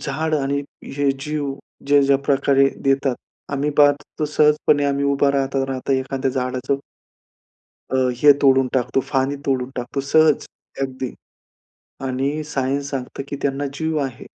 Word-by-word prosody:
झाड 155 Hz, +3 st, -2 dB
आणि 140 Hz, 0 st, 0 dB, 0.4 s
हे 140 Hz, -1 st, +2 dB
जीव 145 Hz, -1 st, -3 dB, 0.3 s
ज्या, 145 Hz, 0 st, +5 dB
ज्या 140 Hz, 0 st, +4 dB
प्रकारे 140 Hz, -1 st, +3 dB
देतात, 135 Hz, -1 st, +2 dB, 0.4 s
आम्ही 140 Hz, +1 st, 0 dB
पाहत, 145 Hz, -1 st, +7 dB, 0.2 s
तो 155 Hz, -, +1 dB
सहजपणे 150 Hz, -1 st, +3 dB
आम्ही 140 Hz, 0 st, 0 dB
उभा 140 Hz, 0 st, +3 dB
राहता 135 Hz, -1 st, 0 dB
राहता 135 Hz, 0 st, -2 dB
एखाद्या 130 Hz, 0 st, -1 dB
झाडाचं 130 Hz, +1 st, -2 dB, 1.1 s
अ, 130 Hz, -, -1 dB, 0.2 s
हे 145 Hz, +2 st, +8 dB
तोडून 135 Hz, -1 st, +5 dB
टाकतो, 130 Hz, +1 st, +1 dB
पाणी 135 Hz, +1 st, +1 dB
तोडून 130 Hz, -1 st, 0 dB
टाकतो 125 Hz, +3 st, -3 dB
सहज 155 Hz, +2 st, +3 dB, 0.4 s
अगदी 130 Hz, -1 st, -4 dB, 0.9 s
आणि 135 Hz, +4 st, -1 dB
सायन्स 140 Hz, -1 st, -2 dB
सांगतं, 135 Hz, 0 st, -5 dB
की 140 Hz, -, -4 dB
त्यांना 140 Hz, +1 st, -1 dB
जीव 160 Hz, 0 st, -1 dB
आहे 130 Hz, -3 st, -7 dB
140 Hz, 140 wpm, -21 LUFS, 135-145 Hz, 1.1 s, हे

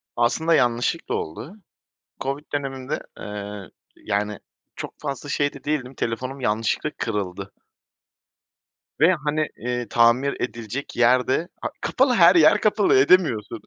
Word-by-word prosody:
Aslında 160 Hz, +8 st, +2 dB
yanlışlıkla 120 Hz, +5 st, 0 dB
oldu. 120 Hz, -, -6 dB, 0.7 s
COVID 140 Hz, +2 st, -3 dB
döneminde, 135 Hz, 0 st, -3 dB, 0.2 s
ııı, 105 Hz, -3 st, -7 dB, 0.3 s
yani, 105 Hz, -1 st, -2 dB, 0.4 s
çok -, -, -7 dB
fazla 140 Hz, -1 st, -5 dB
şey 145 Hz, 0 st, 0 dB
de 140 Hz, -, -13 dB
değildim, 135 Hz, -3 st, -2 dB
telefonum 130 Hz, +3 st, -4 dB
yanlışlıkla 115 Hz, +5 st, 0 dB
kırıldı 100 Hz, -3 st, -4 dB, 1.5 s
ve, 170 Hz, +4 st, +6 dB
hani, 155 Hz, +1 st, 0 dB, 0.2 s
ııı, 125 Hz, -1 st, -2 dB
tamir 120 Hz, +4 st, +3 dB
edilecek 120 Hz, +3 st, -5 dB
yer 125 Hz, +1 st, +4 dB
de, 160 Hz, +6 st, 0 dB
a -, -, -1 dB
kapalı, 260 Hz, 0 st, +2 dB
her 175 Hz, -2 st, +7 dB
yer 160 Hz, -3 st, +6 dB
kapalı, 210 Hz, -7 st, +3 dB
edemiyorsun 130 Hz, -, +3 dB
130 Hz, 125 wpm, -23 LUFS, 115-150 Hz, 1.5 s, her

